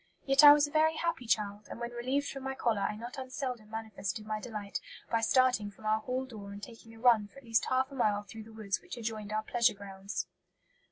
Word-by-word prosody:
Yet 275 +1 +5
I 290 - +13
was 295 0 +6
a 290 - -8
very 315 +1 +3
happy 335 -8 -2
child, 210 -1 0
and - - -7
when 235 0 -4
relieved 260 +4 -1
from 270 - -6
my 265 0 -3
collar 230 -6 +1
I 210 - 0
not 240 +4 -7
unseldom 255 -4 -5
manifested 215 -2 -4
my 215 0 -2
delight 210 -3 -5 0.3
by 230 -1 +2
starting 250 -3 +3
from 205 +1 -15
our 215 0 +3
hall 255 +3 -2
door 210 -6 -9
and 200 +1 -9
taking 225 -1 -11
a - - -14
run 230 -4 +5
for 240 - -21
at 275 - -12
least 225 -1 +2
half 260 +1 +1
a - - -8
mile 210 -5 +1
through 215 +2 -10
the 225 - -13
woods 210 -3 -2
which - - -8
adjoined 215 -2 -4
our 215 0 0
pleasure 235 0 +2
grounds." 195 0 -5
225 Hz, 235 wpm, -31 LUFS, 210-255 Hz, 0.3 s, I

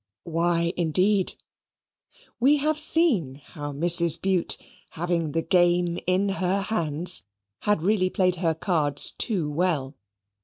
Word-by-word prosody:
Why, 170 +1 -1
indeed? 185 +4 +1 1.0
We 275 +5 +4
have 305 +2 -1
seen 290 - +1
how 145 +1 -9
Mrs. 170 +2 +2
Bute, 190 -3 +1 0.3
having 170 -2 -3
the 165 - -1
game 175 -1 +1
in 185 +2 +1
her 190 +2 0
hands, 175 -4 +1 0.4
had 205 -6 0
really 190 -1 +1
played 185 -1 0
her 165 -2 0
cards 155 -4 +2
too 190 -10 -2
well. 150 -3 -1
175 Hz, 120 wpm, -24 LUFS, 160-190 Hz, 1.0 s, We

